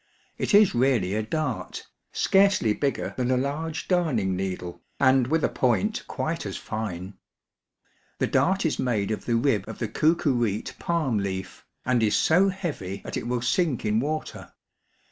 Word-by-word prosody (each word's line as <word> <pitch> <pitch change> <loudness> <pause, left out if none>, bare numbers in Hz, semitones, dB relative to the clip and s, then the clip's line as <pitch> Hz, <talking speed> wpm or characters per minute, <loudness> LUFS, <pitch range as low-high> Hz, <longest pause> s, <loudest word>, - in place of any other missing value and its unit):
It - - +2
is 205 -2 +6
really 120 -7 +2
a 110 - 0
dart, 150 +8 -3 0.3
scarcely 195 - +3
bigger 140 +4 -2
than 125 -1 0
a 130 - +3
large 150 +4 -3
darning 135 - +1
needle, 90 -2 -4 0.2
and 130 -2 +4
with 160 +3 +1
a - - +4
point 135 - 0
quite 165 +1 -3
as 100 -2 -5
fine. 100 -4 -5 1.0
The - - +1
dart 190 0 +1
is 160 - 0
made 110 -5 0
of 110 - -4
the 120 - +1
rib 115 -5 +1
of 110 - -7
the 115 - -2
coocooreete 120 - 0
palm 155 -10 0
leaf, 95 -2 -5 0.2
and 125 -1 +2
is 110 -2 +2
so 185 +5 +4
heavy 145 - -5
that - - -5
it 115 - -3
will 120 -1 -1
sink 135 0 +1
in 105 +1 +2
water. 155 +5 -4
125 Hz, 165 wpm, -26 LUFS, 105-160 Hz, 1.0 s, is